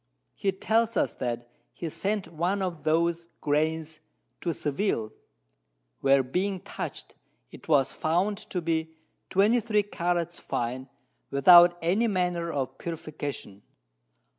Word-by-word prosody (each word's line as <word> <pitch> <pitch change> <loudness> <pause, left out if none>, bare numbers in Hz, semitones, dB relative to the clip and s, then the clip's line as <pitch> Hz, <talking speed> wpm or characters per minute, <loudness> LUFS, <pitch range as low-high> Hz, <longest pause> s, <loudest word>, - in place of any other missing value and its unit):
He 195 - 0
tells 225 +4 +1
us - - +1
that 120 -1 -4 0.2
he 170 - -5
sent 200 +5 -2
one 180 +5 0
of 170 -5 -4
those 170 +1 +1
Grains 155 +1 -1 0.4
to 170 - -1
Seville, 145 - -1 0.9
where 135 0 +4
being 185 +9 -1
touch'd, - - -6 0.4
it - - -13
was 140 -4 +3
found 185 +6 0
to 210 -4 -4
be 160 -1 -1 0.3
23 210 +1 +3
Carats 175 -3 -2
fine, 125 +2 -3 0.4
without 175 +5 +7
any 195 +8 +2
manner 180 -4 0
of 135 -4 -3
Purification. 145 - -6
170 Hz, 115 wpm, -27 LUFS, 150-190 Hz, 0.9 s, without